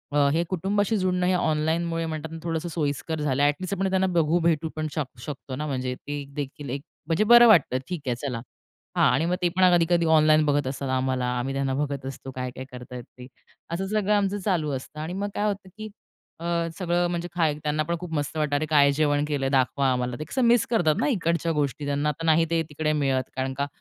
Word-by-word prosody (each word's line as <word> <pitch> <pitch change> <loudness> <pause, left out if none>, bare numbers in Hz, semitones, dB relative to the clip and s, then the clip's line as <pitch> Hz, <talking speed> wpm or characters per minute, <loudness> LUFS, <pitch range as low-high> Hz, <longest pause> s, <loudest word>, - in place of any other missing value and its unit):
अ 145 -1 +4
हे 165 +2 +2
कुटुंबाशी 205 +4 0
जुडणं, 180 -1 +1
हे 185 - +3
ऑनलाईनमुळे 165 0 0
म्हणतात 160 0 -5
ना 165 - -6
थोडंसं 165 0 -2
सोयीस्कर 155 0 -2
झालं. 140 -1 +1
ॲटलीस्ट 160 +7 0
आपण 195 0 0
त्यांना 190 0 +2
बघू, 170 -2 +2
भेटू 165 -1 +1
पण 155 0 -2
शक 135 -5 -4
शकतो 135 +1 -7
ना 150 +3 -3
म्हणजे 130 -2 -2
ते 145 +1 -6
देखील 145 -1 -5
एक 135 +2 -3 0.3
म्हणजे 165 +5 +2
बरं 240 +2 +8
वाटतं 165 - +5
ठीक 180 -3 -4
आहे 125 - +1
चला. 125 -2 -4 0.6
हां - - +5
आणि 160 - +1
मग 175 +1 +1
ते 175 - +2
पण 185 - +4
कधी-कधी 170 0 +2
ऑनलाईन 155 -1 +5
बघत 145 -2 +1
असतात 135 0 -4
आम्हाला. 130 -1 0
आम्ही 135 +2 -2
त्यांना 135 -1 -1
बघत 140 -1 -2
असतो 135 0 -7
काय-काय 130 0 -5
करत 125 0 -10
आहेत 125 -1 -6
ते? 125 - -10 0.5
असं 190 +3 -2
सगळं 210 0 +1
आमचं 200 0 +1
चालू 165 -7 +1
असतं 135 +3 -8
आणि 160 +3 -4
मग 200 +2 -2
काय 205 - 0
होतं 200 -2 -3
की 215 0 -6 0.5
अ, 170 - -7 0.3
सगळं 175 -1 +1
म्हणजे 175 0 -3
खाय 160 -4 +2
त्यांना 150 0 0
पण 170 +3 -2
खूप 175 -2 -7
मस्त 145 0 -2
वाटतं. 150 -2 0
"अरे 150 +2 0
काय 145 -2 +4
जेवण 145 0 +1
केलं 145 -3 -2
आहे 135 - 0
दाखवा 135 0 +2
आम्हाला" 125 -1 -1
ते - - -3
कसं 260 - -2
मिस 235 -1 +4
करतात 175 -10 +2
ना - - +1
इकडच्या 170 - 0
गोष्टी, 145 -1 -1
त्यांना 145 +1 0
आता 160 +3 -4
नाही 165 +1 +4
ते 165 -1 +2
तिकडे 155 +1 -1
मिळत 135 -3 0
कारण 130 0 -2
का 140 0 0
155 Hz, 225 wpm, -25 LUFS, 140-175 Hz, 0.6 s, बरं